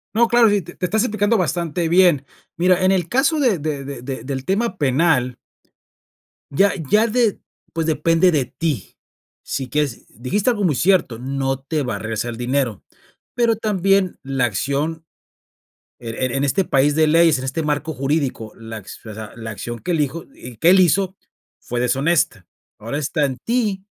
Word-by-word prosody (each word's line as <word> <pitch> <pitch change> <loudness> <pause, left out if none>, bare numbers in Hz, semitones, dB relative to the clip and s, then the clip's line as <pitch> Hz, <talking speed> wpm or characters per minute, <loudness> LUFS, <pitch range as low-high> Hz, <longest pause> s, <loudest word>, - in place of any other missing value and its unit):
No, 235 +1 +4
claro, 235 -2 +5
y 205 - +3
sí 200 - +1
te 175 +2 -12
te 180 - -2
estás 215 +5 +1
explicando 215 -1 +1
bastante 170 -1 -1
bien. 170 -6 +4 0.3
Mira, 180 +2 +3
en 190 - +4
el 175 -3 -1
caso 275 +5 +2
de 225 - +2
de 145 -2 -3
de 140 -2 -7
de 130 +1 -6
del 130 -1 -4
tema 195 0 0
penal. 130 -3 +2 1.2
Ya 195 +8 +3 0.2
ya 220 +2 +4
de 230 -2 +1 0.3
pues, 165 0 -1
depende 165 +3 +3
de 140 -5 +1
ti. 155 +1 -4 0.5
Si 135 -2 -4
quieres 145 -3 -2
dijiste 135 - -1
algo 210 -4 0
muy 160 -7 +2
cierto, 170 -9 +2
no 135 0 -2
te 150 +2 -2
va 125 -5 -2
a - - -5
regresar 115 +1 -3
dinero. 125 -3 -1 0.5
Pero 235 -2 +2
también 195 -3 +1
la 135 -2 0
acción 140 - -2 0.9
er 120 +2 -3
en 135 +2 -1
este 190 +8 +1
país 145 0 +2
de 160 -1 +4
leyes, 165 -2 +4
en 130 - -6
este 135 +5 -2
marco 150 +1 -1
jurídico, 135 -5 -2
la 115 -1 -8
acci 110 +2 -11
o - - -7
sea, 110 0 -8
la 115 -1 -7
acción 120 +3 -6
que 180 - -3
elijo 160 0 -1
y 125 -1 -11
que 165 - +4
él 190 - +6
hizo 185 +2 +3 0.4
fue 120 - -4
deshonesta. 135 - +1 0.3
Ahora 115 +7 -4
está 150 +1 0
en 130 -2 -3
ti, 215 -5 0
155 Hz, 180 wpm, -20 LUFS, 130-185 Hz, 1.2 s, él